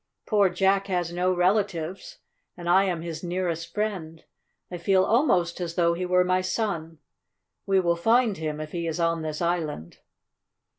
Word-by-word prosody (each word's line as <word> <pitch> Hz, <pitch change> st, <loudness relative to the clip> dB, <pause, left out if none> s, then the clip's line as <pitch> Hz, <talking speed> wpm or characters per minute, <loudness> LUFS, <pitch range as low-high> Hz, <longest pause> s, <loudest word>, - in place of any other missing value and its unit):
Poor 205 Hz, -3 st, +3 dB
Jack 195 Hz, +2 st, +1 dB
has 175 Hz, -3 st, -1 dB
no 180 Hz, +1 st, +1 dB
relatives, 190 Hz, -, -1 dB, 0.4 s
and 175 Hz, -1 st, -7 dB
I 190 Hz, +3 st, +5 dB
am 175 Hz, -4 st, -2 dB
his 165 Hz, -1 st, -6 dB
nearest 170 Hz, -2 st, -3 dB
friend. 185 Hz, -7 st, -4 dB, 0.5 s
I 175 Hz, -, -5 dB
feel 190 Hz, +2 st, +3 dB
almost 190 Hz, -, +2 dB
as 170 Hz, -1 st, -4 dB
though 170 Hz, -1 st, +3 dB
he 180 Hz, +2 st, -3 dB
were 180 Hz, 0 st, +4 dB
my 185 Hz, 0 st, +2 dB
son. 185 Hz, -5 st, -3 dB, 0.7 s
We 195 Hz, -1 st, +3 dB
will 170 Hz, -1 st, +1 dB
find 225 Hz, +4 st, +2 dB
him 155 Hz, -1 st, -4 dB
if 155 Hz, 0 st, -6 dB
he 170 Hz, -1 st, -3 dB
is 165 Hz, +1 st, -3 dB
on 165 Hz, -1 st, +1 dB
this 155 Hz, +1 st, -4 dB
island." 160 Hz, -, -3 dB
175 Hz, 165 wpm, -26 LUFS, 165-190 Hz, 0.7 s, I